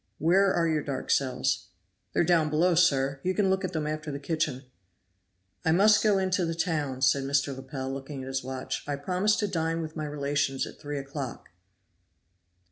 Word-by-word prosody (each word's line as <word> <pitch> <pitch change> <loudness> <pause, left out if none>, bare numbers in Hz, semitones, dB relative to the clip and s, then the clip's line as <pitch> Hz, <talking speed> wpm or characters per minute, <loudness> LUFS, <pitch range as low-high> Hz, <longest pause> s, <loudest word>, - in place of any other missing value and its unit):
"Where 190 +5 +4
are 170 -2 +2
your 155 -2 +1
dark 140 -2 -3
cells?" 130 -4 +1 0.5
"They - - +3
are - - +4
down 165 -3 +3
below, 170 +4 +3
sir. 140 -5 +3
You 185 +3 -1
can 195 -2 +2
look 190 +1 0
at 185 - -2
them 155 -2 -1
after 155 0 -3
the 140 - -4
kitchen." 145 -3 -2 1.0
"I 160 - +2
must 210 +4 +5
go 210 -2 +3
into 185 -1 +1
the 165 -1 -1
town," 150 -6 -1
said 135 +1 +4
Mr. 135 0 0
Lepel, 135 0 -5
looking 135 0 -6
at - - -8
his 135 -1 -2
watch. 130 0 -4
"I 145 - -1
promised 185 +8 +1
to 205 - +1
dine 165 -2 -1
with 155 0 -7
my 155 -1 -3
relations 145 -2 -1
at - - -11
three 145 0 -5
o'clock." 135 -2 -6
150 Hz, 195 wpm, -28 LUFS, 135-175 Hz, 1.0 s, must